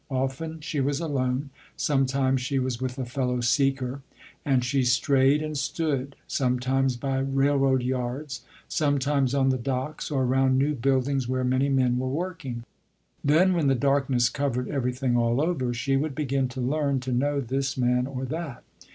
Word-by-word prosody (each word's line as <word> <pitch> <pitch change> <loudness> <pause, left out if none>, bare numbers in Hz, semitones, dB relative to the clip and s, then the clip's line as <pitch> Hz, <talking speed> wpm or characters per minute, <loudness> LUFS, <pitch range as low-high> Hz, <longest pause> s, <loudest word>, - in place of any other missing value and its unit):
Often 135 +5 -3
she 150 -1 -3
was 140 +1 0
alone, 135 -3 -1 0.3
sometimes 135 -2 +1
she 135 +2 -1
was 130 -2 -1
with 130 0 -3
a 130 - -3
fellow 125 0 -1
seeker, 135 +1 +1 0.4
and 130 -3 +2
she 135 +1 +1
strayed 135 +3 +3
and 155 0 -4
stood, 140 -2 -2
sometimes 130 0 0
by 135 +1 -1
railroad 135 -1 +2
yards, 130 +2 -3 0.3
sometimes 140 -2 +1
on 135 -1 +3
the 130 -1 +1
docks 130 +4 -3
or 135 -3 0
around 130 +1 +3
new 140 +3 +2
buildings 135 0 0
where 130 0 -1
many 130 +2 +1
men 130 -2 +2
were 130 0 -2
working. 140 -6 -4 0.6
Then 170 +6 +4
when 165 -5 +1
the 135 - +4
darkness 135 -2 +2
covered 125 -2 -2
everything 125 -1 -1
all 120 +1 +2
over, 150 -6 0
she 120 +3 0
would 145 0 -2
begin 135 -3 0
to 130 +1 -6
learn 140 +1 0
to 130 0 -4
know 140 +4 +1
this 135 +1 -2
man 125 0 +2
or 130 -1 -4
that. 150 -2 -5
135 Hz, 165 wpm, -26 LUFS, 125-140 Hz, 0.6 s, Then